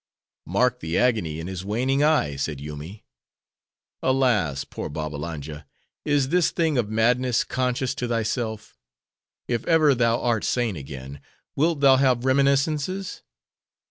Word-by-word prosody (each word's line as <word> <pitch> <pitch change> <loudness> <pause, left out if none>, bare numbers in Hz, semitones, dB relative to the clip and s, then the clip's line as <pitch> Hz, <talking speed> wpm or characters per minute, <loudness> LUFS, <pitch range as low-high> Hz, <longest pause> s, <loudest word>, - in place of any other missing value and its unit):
"Mark 125 +7 +1
the 80 -4 -2
agony 105 -11 +1
in 80 - -5
his 95 0 -5
waning 130 +8 0
eye," 150 - +2
said 70 +1 -3
Yoomy;—"alas, 80 - -4
poor - - -7
Babbalanja! 75 -1 -6 0.4
Is 145 -3 +1
this 175 +1 +3
thing 165 -3 0
of 105 -4 -1
madness 120 +2 +2
conscious 130 0 -1
to 125 -3 -3
thyself? 115 -1 -3 0.7
If 120 -2 -1
ever 155 -4 +5
thou 115 -2 +2
art 115 -3 0
sane 120 -5 0
again, 70 -1 -8 0.3
wilt 155 0 +1
thou 135 -2 +6
have 130 -2 +2
reminiscences? 140 +7 +1
120 Hz, 125 wpm, -24 LUFS, 80-135 Hz, 0.7 s, thou